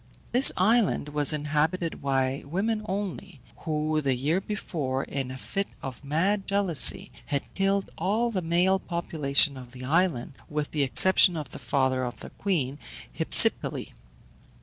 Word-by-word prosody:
This 255 +3 +8
island 210 -5 +1
was 150 0 +2
inhabited 155 +3 -2
by 135 -1 -1
women 210 +7 -2
only, 195 -4 -5 0.2
who, 155 -1 -2
the 135 -3 0
year 150 +9 -1
before, 150 -10 -4
in 135 -2 -5
a 130 - -7
fit 195 +8 -4 0.2
of 135 -1 -8
mad 185 +8 -1
jealousy, 195 -7 +4 0.2
had 140 -1 -4
killed 195 0 -1
all 215 +7 0
the 190 -4 -2
male 180 +3 +1
population 150 -6 +2
of 125 -1 -12
the 130 0 -9
island, 155 -4 0 0.2
with 150 -1 -4
the 150 - -1
exception 175 +5 +5
of 145 -4 -7
the - - -9
father 130 -2 -1
of 125 0 -6
their - - -10
queen, 145 -8 -3 0.4
Hypsipyle. - - +1
155 Hz, 150 wpm, -26 LUFS, 140-190 Hz, 0.4 s, This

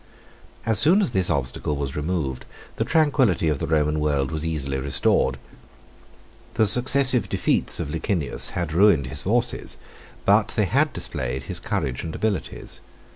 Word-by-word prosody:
As 110 -2 +5
soon 165 - +6
as 195 - +1
this 95 -5 +1
obstacle 70 +2 -2
was 70 -1 -4
removed, 75 -5 -3 0.3
the - - +1
tranquillity 135 - +2
of 75 -3 -1
the - - -3
Roman 75 -1 +1
world 70 -3 0
was 80 -1 -3
easily 70 -4 -3
restored. 70 +1 +1 1.2
The 110 - +3
successive 125 +3 +3
defeats - - 0
of 75 - -4
Licinius 80 -1 -2
had 85 -3 -2
ruined 85 -6 +4
his 65 - -3
forces, - - 0 0.5
but - - +3
they - - +2
had - - +1
displayed 65 +1 -4
his - - -6
courage 65 -2 -3
and 80 - -6
abilities. 110 -3 -3
80 Hz, 150 wpm, -23 LUFS, 70-105 Hz, 1.2 s, soon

